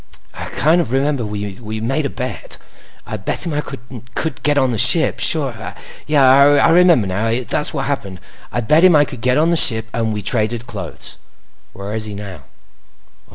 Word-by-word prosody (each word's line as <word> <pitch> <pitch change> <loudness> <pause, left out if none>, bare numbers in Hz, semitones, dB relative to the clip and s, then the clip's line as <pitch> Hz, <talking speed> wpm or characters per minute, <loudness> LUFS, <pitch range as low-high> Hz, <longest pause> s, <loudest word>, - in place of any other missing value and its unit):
"I - - -8
kind 165 +4 0
of 160 - -6
remember 135 -1 -1
we 105 +1 -7
made 135 +6 -2
a - - -9
bet. 125 0 -7 0.5
I 110 - -6
bet 100 - -4
him 165 - -4
I 145 - -2
could 125 +4 -8
get 145 -1 0
on 130 -3 +1
the 115 - -3
ship. 155 +7 +5
Sure—I 140 +1 +2
remember, 170 - +3
now. 115 +6 -2
That's 150 - -2
what 135 -3 -4
happened; 100 -10 -5 0.3
I 120 - -3
bet 150 +9 +2
him 185 -3 +5
I 145 0 +4
could 130 -4 -11
get 125 +1 0
on 160 +3 +1
the - - +1
ship 110 -7 +7
and 115 -1 -2
we 105 -1 -5
traded 110 +2 -2
clothes." 125 - -8 0.5
"Where 100 +2 -8
is 110 0 -2
he 105 -1 -8
now?" 95 -8 -10
125 Hz, 180 wpm, -17 LUFS, 110-145 Hz, 0.5 s, ship